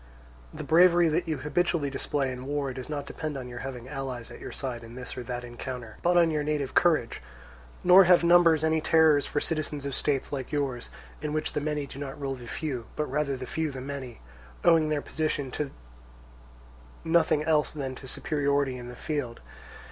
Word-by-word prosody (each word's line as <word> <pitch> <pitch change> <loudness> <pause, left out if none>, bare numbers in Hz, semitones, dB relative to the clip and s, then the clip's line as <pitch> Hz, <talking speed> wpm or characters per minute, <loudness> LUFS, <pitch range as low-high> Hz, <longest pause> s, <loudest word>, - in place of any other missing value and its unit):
The - - -7
bravery 175 0 +5
that 165 +3 0
you 155 -2 -1
habitually 150 0 0
display 135 0 -1
in 125 +1 -7
war 140 -2 -1
does 130 +2 -7
not 145 -2 -3
depend 155 -1 -5
on 130 -2 -6
your 120 -1 -7
having 130 -2 -6
allies 130 -4 -5
at - - -10
your - - -7
side 125 -4 -4
in 115 +1 -11
this 125 0 -7
or 125 - -5
that 125 0 -5
encounter, 120 -1 -7
but 175 +1 +3
on 170 -2 +5
your 150 -1 0
native 145 -2 -1
courage; 160 -9 +2 0.6
nor 185 +2 +8
have 175 -1 +6
numbers 170 -2 +5
any 160 0 +2
terrors 155 -3 +4
for 145 - -1
citizens 150 -3 -3
of 140 - -3
states 140 0 -1
like 135 -3 -4
yours, 140 -5 -2 0.3
in 150 -1 -3
which 155 - -1
the 150 - -1
many 150 -1 -1
do 140 - -10
not 140 0 -6
rule 135 -1 -2
the 125 -2 -9
few, 130 -4 -4
but 150 - -1
rather 140 -1 0
the 130 - -6
few 160 +5 -2
the 135 -2 -7
many, 130 -2 -7 0.4
owing 160 -2 +5
their 150 -2 0
position 150 -4 -2
to 150 +1 -3 1.3
nothing 160 -2 +3
else 155 -1 +2
than 135 -4 -4
to 130 - -10
superiority 140 -2 0
in 120 -1 -8
the 125 - -8
field. 135 -3 -3
145 Hz, 200 wpm, -28 LUFS, 130-155 Hz, 1.3 s, nor